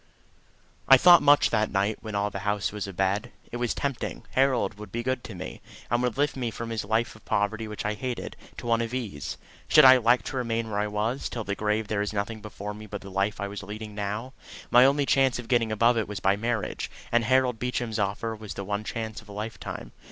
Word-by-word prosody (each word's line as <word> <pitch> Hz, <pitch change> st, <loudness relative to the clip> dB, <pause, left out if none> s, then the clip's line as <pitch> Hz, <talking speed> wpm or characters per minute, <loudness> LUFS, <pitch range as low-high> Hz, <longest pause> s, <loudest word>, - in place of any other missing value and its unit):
I 135 Hz, -, +9 dB
thought 175 Hz, +5 st, +8 dB
much 145 Hz, 0 st, +5 dB
that 110 Hz, -1 st, +2 dB
night 100 Hz, +2 st, 0 dB
when 110 Hz, -2 st, -6 dB
all 100 Hz, 0 st, 0 dB
the 100 Hz, -, -4 dB
house 105 Hz, 0 st, -1 dB
was 105 Hz, -1 st, -4 dB
abed. 100 Hz, +5 st, -1 dB, 0.2 s
It 120 Hz, -, -4 dB
was 120 Hz, -1 st, -1 dB
tempting. 140 Hz, -3 st, -3 dB
Harold 130 Hz, -5 st, +1 dB
would 105 Hz, -2 st, -9 dB
be 120 Hz, +2 st, -3 dB
good 130 Hz, 0 st, -1 dB
to 110 Hz, -, -8 dB
me, 90 Hz, +4 st, -7 dB, 0.3 s
and 120 Hz, 0 st, +2 dB
would 125 Hz, 0 st, -1 dB
lift 145 Hz, +1 st, +1 dB
me 125 Hz, -3 st, -2 dB
from 115 Hz, +1 st, -6 dB
this 115 Hz, -2 st, -2 dB
life 110 Hz, +3 st, 0 dB
of 110 Hz, -, -17 dB
poverty 110 Hz, +2 st, -1 dB
which 105 Hz, -1 st, -6 dB
I 105 Hz, -, +1 dB
hated, 125 Hz, +3 st, -5 dB, 0.2 s
to -, -, -8 dB
one 115 Hz, 0 st, +2 dB
of 115 Hz, +2 st, -3 dB
ease. 100 Hz, -, -4 dB, 0.3 s
Should 150 Hz, -2 st, +7 dB
I 130 Hz, 0 st, +10 dB
elect 120 Hz, +1 st, +3 dB
to 135 Hz, -, -4 dB
remain 115 Hz, -2 st, -1 dB
where 100 Hz, -, -1 dB
I 105 Hz, -, 0 dB
was, 110 Hz, +5 st, -2 dB
till 115 Hz, -, -4 dB
the 100 Hz, -, -2 dB
grave 105 Hz, +1 st, -1 dB
there 105 Hz, -1 st, -1 dB
was 105 Hz, +1 st, -1 dB
nothing 105 Hz, +2 st, -3 dB
before 105 Hz, -1 st, -6 dB
me 110 Hz, +1 st, -10 dB
but 105 Hz, 0 st, -6 dB
the 100 Hz, -, -10 dB
life 100 Hz, +2 st, 0 dB
I 100 Hz, -, -2 dB
was 100 Hz, +1 st, -6 dB
leading 105 Hz, +2 st, -7 dB
now: 105 Hz, +5 st, -4 dB, 0.4 s
my 125 Hz, +2 st, +8 dB
only 140 Hz, +1 st, +3 dB
chance 135 Hz, -2 st, +3 dB
of 125 Hz, -2 st, -7 dB
getting 115 Hz, -2 st, +2 dB
above 115 Hz, +2 st, +3 dB
it 110 Hz, -, -2 dB
was 105 Hz, -2 st, -5 dB
by 95 Hz, +2 st, +3 dB
marriage, 115 Hz, +1 st, -2 dB, 0.2 s
and 120 Hz, 0 st, +3 dB
Harold 125 Hz, -1 st, +2 dB
Beecham's 120 Hz, -3 st, -2 dB
offer 105 Hz, +3 st, -1 dB
was 110 Hz, -1 st, -8 dB
the 100 Hz, -, -4 dB
one 100 Hz, +2 st, -2 dB
chance 110 Hz, 0 st, -5 dB
of -, -, -19 dB
a -, -, -8 dB
lifetime. 105 Hz, +2 st, -6 dB
110 Hz, 240 wpm, -27 LUFS, 105-120 Hz, 0.4 s, I